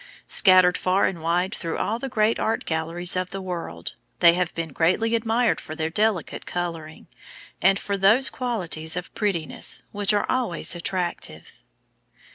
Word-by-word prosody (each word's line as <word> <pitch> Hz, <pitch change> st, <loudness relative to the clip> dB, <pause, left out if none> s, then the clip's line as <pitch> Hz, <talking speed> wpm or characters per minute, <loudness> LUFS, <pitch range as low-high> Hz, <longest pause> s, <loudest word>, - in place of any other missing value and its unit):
Scattered 185 Hz, -3 st, +5 dB
far 185 Hz, +2 st, +2 dB
and 170 Hz, -4 st, -2 dB
wide 175 Hz, +3 st, 0 dB
through 165 Hz, -2 st, -4 dB
all 225 Hz, +2 st, -1 dB
the 270 Hz, -, -4 dB
great 220 Hz, -2 st, +1 dB
art 225 Hz, -, -1 dB
galleries 165 Hz, +3 st, 0 dB
of 185 Hz, 0 st, -1 dB
the 195 Hz, -, -5 dB
world, 170 Hz, -, -6 dB, 0.3 s
they 170 Hz, -1 st, +7 dB
have 180 Hz, -1 st, 0 dB
been 165 Hz, -1 st, -3 dB
greatly 185 Hz, +9 st, +1 dB
admired 230 Hz, +1 st, +1 dB
for 155 Hz, -, -8 dB
their 160 Hz, 0 st, -2 dB
delicate 210 Hz, -2 st, -1 dB
coloring, 165 Hz, -3 st, -5 dB, 0.5 s
and 195 Hz, +2 st, +4 dB
for 200 Hz, 0 st, -3 dB
those 215 Hz, +8 st, +4 dB
qualities 180 Hz, -10 st, -2 dB
of 180 Hz, -, -6 dB
prettiness 190 Hz, -8 st, -2 dB
which 205 Hz, -1 st, 0 dB
are 205 Hz, -, +1 dB
always 240 Hz, -11 st, 0 dB
attractive. 175 Hz, 0 st, -4 dB
185 Hz, 155 wpm, -24 LUFS, 170-215 Hz, 0.5 s, they